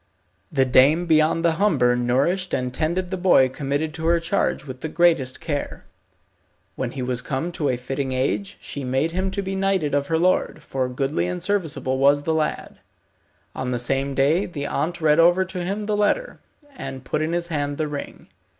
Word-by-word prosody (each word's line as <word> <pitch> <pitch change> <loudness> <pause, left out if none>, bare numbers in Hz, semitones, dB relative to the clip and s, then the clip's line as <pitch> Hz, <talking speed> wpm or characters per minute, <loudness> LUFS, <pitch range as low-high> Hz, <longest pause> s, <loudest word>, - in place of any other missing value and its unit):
The 135 -3 +2
dame 140 +7 +4
beyond 160 +1 +3
the 165 -1 +2
Humber 130 -12 +3
nourished 135 +10 0
and 125 -1 -3
tended 170 +5 -1
the 190 - -1
boy 175 -8 +4
committed 140 +3 -2
to 160 0 -4
her 170 0 +4
charge 170 -4 -1
with 130 -2 -8
the 160 - -3
greatest 165 -6 +2
care. 145 -3 -4 0.9
When 125 -2 -3
he 130 - -4
was 125 0 -2
come 150 +7 -3
to 155 -4 -1
a 125 - 0
fitting 130 +2 -3
age 140 +10 -1
she 140 - -7
made 130 +5 0
him 185 +2 -1
to 200 +1 -3
be 195 0 -3
knighted 190 -6 0
of 140 0 +1
her 165 - +1
lord, 180 +3 +1
for 130 -1 -2
goodly 135 +6 -1
and 180 -1 -4
serviceable 145 -10 -1
was 140 +1 +4
the 160 - 0
lad. 155 -1 -2 0.7
On 130 -1 -4
the 125 - -1
same 135 +3 0
day 155 +8 +2
the 145 -5 -5
aunt 170 +4 -2
read 155 0 +4
over 175 +3 +5
to 185 -1 -5
him 200 +4 -3
the 210 0 0
letter, 355 - 0 0.4
and 130 - -7
put 150 - -1
in 160 +2 -1
his 175 0 -2
hand 145 -2 -2
the 155 - -1
ring. 145 -1 -7
155 Hz, 195 wpm, -23 LUFS, 135-175 Hz, 0.9 s, over